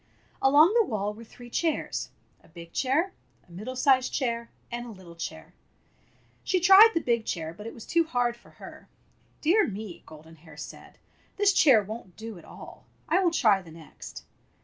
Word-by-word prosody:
Along 295 +8 +6
the 465 -2 +4
wall 210 -2 -2
were 225 +2 -12
three 240 +1 -14
chairs 325 +3 -2 0.2
— - - -37
a - - -21
big 170 0 -13
chair, 310 +9 0 0.3
a - - -21
middle 215 +9 -7
sized 260 0 +3
chair, 235 -3 -2 0.2
and 240 0 -5
a - - -8
little 185 -4 -13
chair. 170 - -7 0.9
She 370 - +1
tried 385 +5 +8
the 330 - +2
big 235 -2 0
chair, 165 -5 -4
but 210 +5 -10
it - - -7
was 230 - -11
too 335 0 +2
hard 245 -5 0
for 240 - -21
her. - - -12 0.5
"Dear 375 +8 +3
me!" 205 -3 -7
Golden 160 +1 -14
Hair 155 -1 -16
said, 145 - -10 0.4
"this 405 -1 +4
chair 250 - +5
won't 200 -3 -9
do 220 -4 -8
at - - -16
all. - - -13 0.2
I 335 +4 +3
will 355 - +4
try 215 -12 +3
the 175 - -15
next." 160 -1 -11
235 Hz, 190 wpm, -27 LUFS, 185-300 Hz, 0.9 s, tried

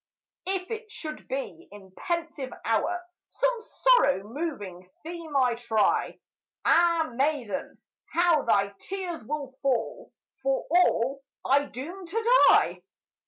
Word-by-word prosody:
If 380 +1 -2
it 445 0 -5
should 310 -8 -7
be 275 +6 -5
in 195 -2 -13
pensive 325 - -4
hour 350 +11 0 0.2
Some - - +1
sorrow 455 - +3
moving 205 - -6
theme 325 -3 -4
I 250 -3 +3
try, 225 -2 +1 0.5
Ah, 335 -3 +4
maiden, 265 -5 -1 0.3
how 340 -3 +3
thy 200 -5 +2
tears 370 - -5
will 280 +1 -5
fall, 275 - -1 0.3
For 270 0 0
all 275 -6 +3 0.2
I 280 +2 +3
doom 335 +9 -8
to 455 +7 +4
die! - - +4
300 Hz, 120 wpm, -27 LUFS, 250-350 Hz, 0.5 s, Ah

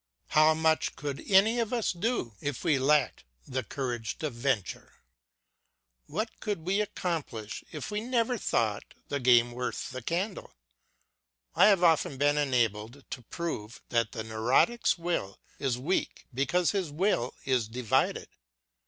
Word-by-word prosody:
How 155 +1 +5
much 160 0 +1
could 145 -2 -5
any 210 +5 +5
of 230 -2 -1
us 235 -3 +1
do 175 - -1
if 145 -3 -3
we 150 -6 +3
lacked 145 +1 +2 0.2
the 130 0 -2
courage 120 -5 -4
to 155 - -3
venture? 120 -5 -2 1.1
What 215 +8 -4
could 200 -7 -3
we 195 +3 +2
accomplish 155 - -4
if - - -6
we 210 0 -1
never 245 0 +1
thought 110 - -1
the 140 - -1
game 120 -2 +5
worth 125 +1 -4
the 130 0 -6
candle? 185 - -3 1.0
I - - +6
have 195 -4 +4
often 165 -3 +3
been 145 +2 +3
enabled 120 -2 0
to 125 - -5
prove 125 -5 -5
that 115 -2 +1
the 110 -3 -4
neurotic's 120 - +2
will 170 - -2 0.2
is 130 -3 0
weak 155 +10 -2
because 170 +7 +1
his 190 -5 -1
will 150 - 0
is 125 -5 +1
divided. 115 -1 0
145 Hz, 145 wpm, -29 LUFS, 120-180 Hz, 1.1 s, I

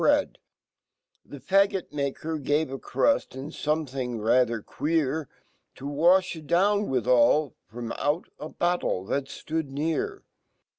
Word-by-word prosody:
bread - - +2 0.8
The 145 - -11
faggt*maker 160 -5 0
gave 145 +1 0
a 135 - -5
cruii 285 - +1
and 135 +3 -7
something 135 -5 -2
rather 115 0 +2
queer 155 -1 -1 0.5
TO 135 - -10
wafKitdownwifhali 155 - +3 0.2
,fromauta 145 +7 -4
battle 175 - 0
fhal 140 - 0
ftoodnear. 160 - -3
150 Hz, 90 wpm, -26 LUFS, 130-165 Hz, 0.8 s, wafKitdownwifhali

